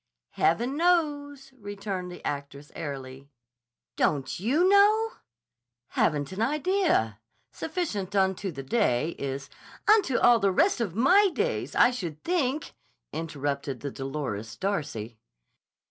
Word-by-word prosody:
"Heaven 240 - +1
knows!" 290 -5 0
returned 200 -3 -5
the 180 - -11
actress 140 0 -5
airily. 135 -3 -7 0.7
"Don't 140 -3 +2
__you 280 - +2
know?" 420 +3 +5 0.8
"Haven't 145 -1 0
an 190 +3 -4
idea. 300 - +1 0.3
Sufficient 220 - -3
unto 190 0 +1
the 135 -3 -7
day 150 - +1
is—" 140 0 -4 0.4
"Unto 415 - +4
all 240 -1 +5
the 200 - +3
rest 310 - +2
of 195 -7 -2
my 370 - +5
days, 480 +8 -2
I 245 - +6
should 170 -11 -6
think," 310 -5 -1 0.4
interrupted 145 -4 -3
the 140 - -4
dolorous 130 -6 -5
Darcy. 140 - -3
195 Hz, 115 wpm, -27 LUFS, -, 0.8 s, I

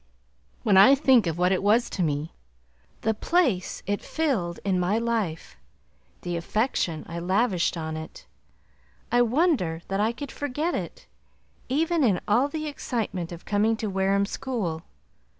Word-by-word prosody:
When 200 -3 +4
I 205 +9 +8
think 260 - +4
of 165 0 -2
what 180 +1 +2
it 190 - +1
was 215 +4 +3
to 190 - -3
me, 150 -1 -1 0.7
the 220 - +1
place 245 - 0
it 205 +1 -1
filled 230 - -1
in 190 -2 +1
my 180 +4 +1
life, 225 -8 -2 0.7
the 175 -1 -3
affection 170 - -1
I 170 0 -5
lavished 185 0 +1
on 160 -1 -4
it, 160 - -9 0.9
I 245 - +4
wonder 240 - +1
that 195 0 -1
I 215 +2 +2
could 270 +4 -7
forget 295 +4 -2
it, - - -5 0.6
even 320 +4 +1
in 200 -8 +3
all 240 +7 +3
the 310 +1 -4
excitement 225 - -3
of 170 +1 -9
coming 215 +2 +1
to 215 -2 -3
Wareham 195 +1 +2
to 200 - -4
school. 195 -12 -3
205 Hz, 155 wpm, -26 LUFS, 175-250 Hz, 0.9 s, I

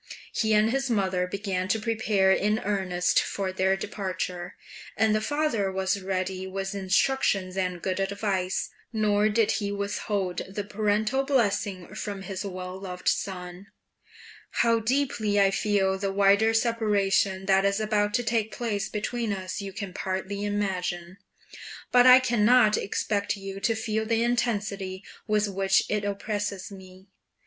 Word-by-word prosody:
He 220 -1 +2
and 215 +1 +3
his 270 0 -1
mother 190 -5 +1
began 190 -1 -2
to 220 +3 +1
prepare 215 -3 +2
in 210 +2 +2
earnest 185 -3 +1
for 195 -2 -3
their 190 +1 +2
departure, 185 -3 -4 0.4
and 220 0 +3
the 215 - +1
father 260 -7 0
was 190 +1 -1
ready 185 0 -3
with 195 +1 -4
instructions 195 -1 +1
and 180 -2 -2
good 185 0 -1
advice, 195 -1 -1 0.2
nor 215 -1 +2
did 220 0 +2
he 200 0 -2
withhold 200 -2 -2
the 200 +1 -4
paternal 215 +5 0
blessing 205 -8 0
from 200 -2 -5
his 190 -2 -5
well 185 -1 -6
loved 180 -2 -7
son: 180 0 -2 0.8
How 230 -1 +2
deeply 225 -4 0
I 195 -1 +4
feel 195 -2 +1
the 195 0 -1
wider 200 +3 +4
separation 205 -4 +1
that 195 0 +4
is 200 +1 +1
about 210 -1 +1
to 245 - +1
take 225 -2 0
place 215 -3 -2
between 225 +1 -2
us 190 0 -4
you 195 -1 -6
can 195 -1 -6
partly 190 +2 -3
imagine, 185 -3 -2 0.7
but 250 0 +6
I 255 0 +10
cannot 235 -2 +4
expect 200 +1 -1
you 195 0 -7
to 225 +3 +1
feel 220 0 -2
the 230 0 +2
intensity 205 -5 -1 0.2
with 210 -1 +2
which 195 -1 +2
it 210 -1 0
oppresses 205 -1 -3
me. 190 -1 -13
200 Hz, 145 wpm, -26 LUFS, 190-215 Hz, 0.8 s, I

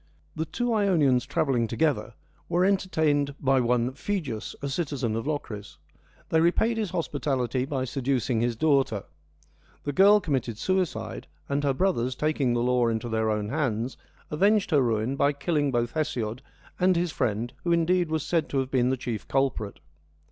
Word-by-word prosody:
The 160 - -2
two 240 +9 -1
Ionians 160 - +3
travelling 125 -6 +1
together 115 -5 0 0.3
were 175 +2 +3
entertained 160 -7 +1
by 135 -1 +3
one 125 +1 +1
Phegeus, 140 - -4
a 140 - -4
citizen 135 -6 -2
of 115 +4 -3
Locris. 110 - -5 0.5
They 160 - +3
repaid 220 +7 +2
his 215 -4 -1
hospitality 135 -7 -1
by 135 -2 -2
seducing 130 -3 0
his 120 0 0
daughter: 135 -6 +2 0.8
the 145 - -3
girl 200 +5 +6
committed 135 - -2
suicide, 185 +4 -2 0.2
and 140 +1 -1
her 140 -2 +1
brothers, 130 -8 0
taking 150 -5 +1
the 120 - +1
law 125 -1 +2
into 115 +1 -2
their 110 -1 0
own 105 -1 -1
hands, 125 -4 -1 0.4
avenged 200 +5 +2
her 145 -3 +5
ruin 115 +1 0
by 140 +1 +3
killing 145 0 0
both 120 -1 0
Hesiod 130 -7 -2 0.4
and 185 0 +4
his 170 0 0
friend, 120 -2 -1
who 175 - 0
indeed 170 +1 +2
was 160 -1 -1
said 165 0 0
to 140 - -2
have 130 0 -1
been 125 -1 +2
the 130 - 0
chief 120 -5 -5
culprit. 135 -7 -1
140 Hz, 165 wpm, -26 LUFS, 120-160 Hz, 0.8 s, girl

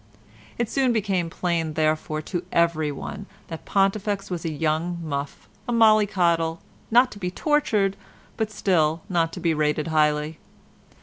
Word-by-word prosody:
It 235 - 0
soon 260 0 +1
became 195 -6 0
plain, 165 -2 -1
therefore, 155 0 0
to 175 +2 -4
everyone 160 -4 -1 0.2
that 165 -1 -7
Pontifex 195 0 0
was 175 -2 -3
a 165 - -2
young 160 +3 -1
muff, 140 -2 -5 0.2
a - - -1
mollycoddle, 190 -8 +3 0.3
not 245 +3 +5
to 205 - -10
be 180 -2 -2
tortured, 210 - +1 0.4
but 220 -2 -1
still 165 -6 +1
not 165 -3 +1
to - - -6
be 165 -2 +1
rated 150 +1 0
highly. 150 0 +1
170 Hz, 140 wpm, -24 LUFS, 155-200 Hz, 0.4 s, not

